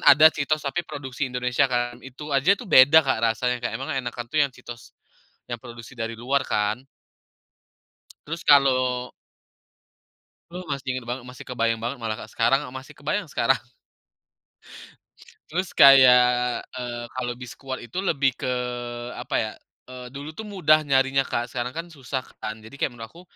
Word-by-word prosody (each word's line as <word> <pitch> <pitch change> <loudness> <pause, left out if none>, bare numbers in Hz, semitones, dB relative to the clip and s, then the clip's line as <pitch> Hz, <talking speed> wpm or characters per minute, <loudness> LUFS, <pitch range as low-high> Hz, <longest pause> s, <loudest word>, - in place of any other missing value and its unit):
ada 155 +3 +9
Cheetos, 155 +1 0
tapi 145 +5 -1
produksi 140 -2 -5
Indonesia 125 -1 +1
kan, 120 0 -2
itu 140 +3 -9
aja 140 +8 +4
tuh, 235 - -10
beda 140 +4 +8
Kak 130 -4 +1
rasanya 125 +2 +1
Kak, 120 - -1
emang 130 +6 -5
enakan 120 -2 -4
tuh 155 - -6
yang 140 - -4
Cheetos, 120 -2 -11 0.6
yang 120 -2 -5
produksi 120 -1 -11
dari 115 -1 -3
luar 130 +4 0
kan 105 +3 0 1.5
terus, 165 +2 -5
kalau 130 -3 +3 1.4
Aduh, 180 +1 -7
masih 140 -3 -4
inget 125 - -7
banget, 120 +1 -4
masih 125 - -11
kebayang 115 -2 0
banget, 120 +4 -4
malah 110 -1 -2
Kak. 110 - -18
Sekarang, 135 +3 +3
masih 130 0 -10
kebayang 155 +4 -2
sekarang. 130 0 +1 1.9
Terus, 180 +2 -3
kayak, 125 -2 +6 0.2
eee, 120 -1 -5
kalau 125 -1 -4
Biskuat 130 +2 -8
itu 120 +8 -9
lebih 140 -6 +1
ke, - - -5 0.7
apa - - -4
ya, - - -3 0.4
eee, 125 -1 -9
dulu 140 +2 -7
tuh 220 +8 -8
mudah 155 -7 +3
nyarinya 135 0 +2
Kak, 120 +1 -2
sekarang 125 0 -4
kan, 165 +1 -5
susah 135 -4 -5 0.2
kan. 110 +1 -6
Jadi, 110 +6 -12
kayak, 135 - -1
menurut 115 -2 -9
aku, 170 - -15
130 Hz, 160 wpm, -24 LUFS, 120-140 Hz, 1.9 s, ada